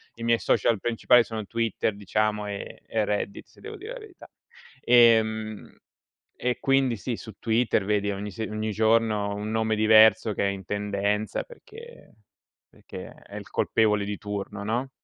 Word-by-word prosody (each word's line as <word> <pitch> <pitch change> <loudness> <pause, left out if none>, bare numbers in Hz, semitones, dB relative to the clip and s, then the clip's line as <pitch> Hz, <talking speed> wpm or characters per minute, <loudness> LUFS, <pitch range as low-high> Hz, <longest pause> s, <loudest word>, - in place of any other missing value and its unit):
i 115 - -9
miei 115 0 +2
social 115 -3 +1
principali 120 +2 +3
sono 110 -2 -6
Twitter 115 -1 -1
diciamo, 105 +1 -1
e 100 -1 -7
e 110 -2 0
Reddit, 100 -1 -3
se - - -22
devo 435 0 -8
dire 425 +6 -8
la - - -8
verità. 420 -5 -14 0.5
Ehm, 110 -3 +3 0.6
e 125 0 -1
quindi 135 -4 +2
sì, 120 +3 -4
su 110 - -10
Twitter 115 -3 +1
vedi 105 -1 0
ogni 100 +1 -5
se 110 +4 -5
ogni 110 0 -3
giorno 110 -1 +1
un 105 +1 -4
nome 110 0 0
diverso 110 0 +5
che - - -2
è - - +1
in 95 -1 -8
tendenza 105 +1 -2
perché 475 - -14 0.5
perché - - -10
è - - -15
il - - -9
colpevole 105 -2 +1
di 100 0 -4
turno, 100 0 -6
no? 120 +6 -2
110 Hz, 165 wpm, -26 LUFS, 105-115 Hz, 0.6 s, diverso